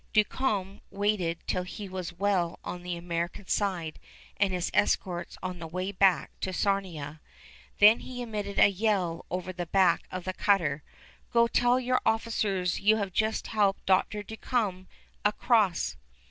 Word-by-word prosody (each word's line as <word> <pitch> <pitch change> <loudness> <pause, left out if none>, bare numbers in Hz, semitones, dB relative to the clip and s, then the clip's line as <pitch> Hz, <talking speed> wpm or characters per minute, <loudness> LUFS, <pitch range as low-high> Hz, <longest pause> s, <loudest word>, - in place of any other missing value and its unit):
Duncombe 210 -3 0
waited 195 -4 -1
till 185 - 0
he 190 +3 -7
was 185 -2 -5
well 175 -2 0
on 180 - -6
the 175 -1 -4
American 170 +2 -4
side, 180 -6 -1 0.4
and 195 -1 +2
his 180 -1 -2
escorts 180 -3 0
on 185 -1 -4
the 165 - -6
way 185 +4 -3
back 190 -2 +3
to 190 - -2
Sarnia. 175 -7 -2 0.6
Then 210 +3 +7
he 250 -1 -6
emitted 210 -3 -4
a - - +8
yell 190 -4 0
over 185 +1 -4
the 175 -1 -5
back 190 +1 +3
of 185 -1 -5
the 185 - -3
cutter, 170 -9 +2 0.5
"Go 235 -1 +4
tell 245 +1 +3
your 255 0 +1
officers 205 -5 0
you 215 +2 +4
have 200 -3 -3
just 220 +3 0
helped 205 -3 +1
Dr. 195 +2 +2
Duncombe 210 -3 -2 0.4
across!" 210 -3 +2
195 Hz, 150 wpm, -28 LUFS, 180-210 Hz, 0.6 s, a